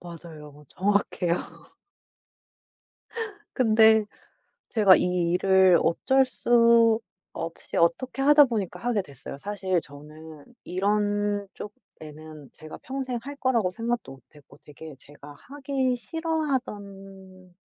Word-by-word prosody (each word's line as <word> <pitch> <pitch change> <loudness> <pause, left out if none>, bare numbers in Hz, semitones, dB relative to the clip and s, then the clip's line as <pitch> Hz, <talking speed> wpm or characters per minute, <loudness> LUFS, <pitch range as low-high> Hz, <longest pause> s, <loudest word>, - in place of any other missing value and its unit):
맞아요. 155 -4 -12
정확해요. 190 -3 0 2.2
근데 220 -3 +4 0.7
제가 205 -5 +6
이 180 -1 0
일을 190 -1 +4
어쩔 265 +10 +2
수 230 -2 +3 0.3
없이 165 0 -7
어떻게 210 +11 0
하다 295 +1 +7
보니까 215 -7 -4
하게 235 -4 -1
됐어요. 140 -2 -10
사실 190 0 -2
저는 150 +1 -12 0.2
이런 205 +2 -1
쪽에는 155 - -12
제가 155 0 -11
평생 260 -2 -4
할 285 +3 -8
거라고 240 -8 0
생각도 230 - -4
못했고 135 +2 -19
되게 150 +1 -11
제가 145 +1 -14
하기 270 -2 -2
싫어하던 200 - -5
200 Hz, 220 characters per minute, -25 LUFS, 165-240 Hz, 2.2 s, 하다